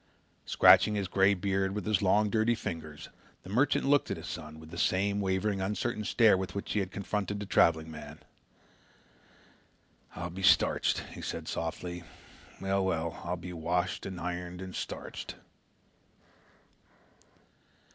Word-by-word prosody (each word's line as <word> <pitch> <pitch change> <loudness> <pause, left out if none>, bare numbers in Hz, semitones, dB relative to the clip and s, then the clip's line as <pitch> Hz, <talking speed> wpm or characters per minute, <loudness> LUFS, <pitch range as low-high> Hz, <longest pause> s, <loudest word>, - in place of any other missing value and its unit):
Scratching 105 - +6
his 100 -2 -1
grey 95 +2 +4
beard 95 +1 -1
with 105 - -3
his 105 -2 +2
long 105 +2 +3
dirty 115 +1 +2
fingers, 80 -7 -6 0.3
the 95 - -9
merchant 140 +5 +2
looked 145 0 +3
at - - -2
his - - -8
son 75 0 -7
with 80 0 -13
the 85 - -8
same 100 +2 +1
wavering 95 +1 0
uncertain 105 +3 -2
stare 110 0 +5
with 95 0 -4
which 100 - -3
he 105 - +1
had 95 -2 -2
confronted 100 +1 -3
the 105 - -4
traveling 80 -4 +3
man. - - -9 2.0
"I'll 85 -1 -5
be 95 +2 -7
starched," 90 - +4
he - - -8
said - - -5
softly. 85 +1 -4 0.6
"Well, 95 0 0
well, 85 -3 -2
I'll 90 0 -2
be 90 +1 -8
washed 85 +2 -1
and 95 -2 -6
ironed 90 0 -4
and 95 -1 -7
starched!" - - -6
95 Hz, 145 wpm, -30 LUFS, 85-105 Hz, 2.0 s, Scratching